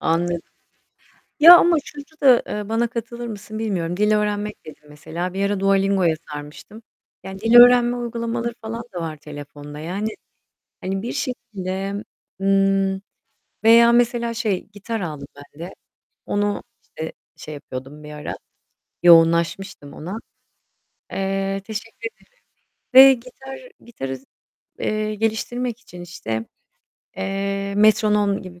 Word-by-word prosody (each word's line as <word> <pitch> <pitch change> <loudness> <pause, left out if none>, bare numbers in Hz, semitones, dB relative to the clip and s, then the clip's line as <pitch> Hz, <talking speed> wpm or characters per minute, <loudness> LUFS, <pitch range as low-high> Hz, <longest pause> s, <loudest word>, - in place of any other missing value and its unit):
Anladım. 170 +1 0 1.0
Ya 340 +4 +11
ama 345 0 +4
şurda 290 0 -11
da, 260 -4 +6
eee, 210 0 -5
bana 230 +1 +1
katılır 235 +1 -6
mısın 215 0 -7
bilmiyorum. 180 -6 -2
Dil 210 +1 +3
öğrenmek 210 0 -2
dedin 155 -1 -12
mesela. 160 +5 -5
Bir 195 +1 0
ara 200 -1 -1
Dualingo'ya 195 -3 +2 0.2
sarmıştım. 150 +9 -10 0.4
Yani 190 0 -8
dil 225 +3 +2
öğrenme 245 0 +8
uygulamaları 235 0 -3
falan 230 +1 -5
da 175 - -4
var 160 -2 -5
telefonda. 145 0 -10
Yani, 190 +7 -3 0.7
hani, 190 +1 -3
bir 235 - -4
şekilde, 200 -6 -4 0.4
ımm, 195 0 +2 0.6
veya 235 +1 +7
mesela 235 0 +2
şey, 220 -5 -2
gitar 210 +2 -5
aldım 150 -5 -6
ben 145 +1 -15
de. 190 - -10 0.5
Onu, 205 0 -1 0.2
işte, 160 0 -7 0.2
şey 155 - -9
yapıyordum 140 +1 -9
bir 150 - -9
ara. 150 0 -6 0.7
Yoğunlaşmıştım 170 -1 +4
ona. 180 +7 -6 1.0
Eee, 195 0 -1
teşekkür 220 +2 -7
ederim - - -28 0.7
ve 270 +1 +11
gitar 260 +2 -10 0.3
gitarı, 135 - -6 0.6
eee, 215 0 -1
geliştirmek 225 +3 -2
için 180 -6 -13
işte, 115 -11 -5 0.7
eee, 195 +1 -3
metronom 210 -1 +3
gibi 180 -2 -12
200 Hz, 125 wpm, -22 LUFS, 175-230 Hz, 1.0 s, Ya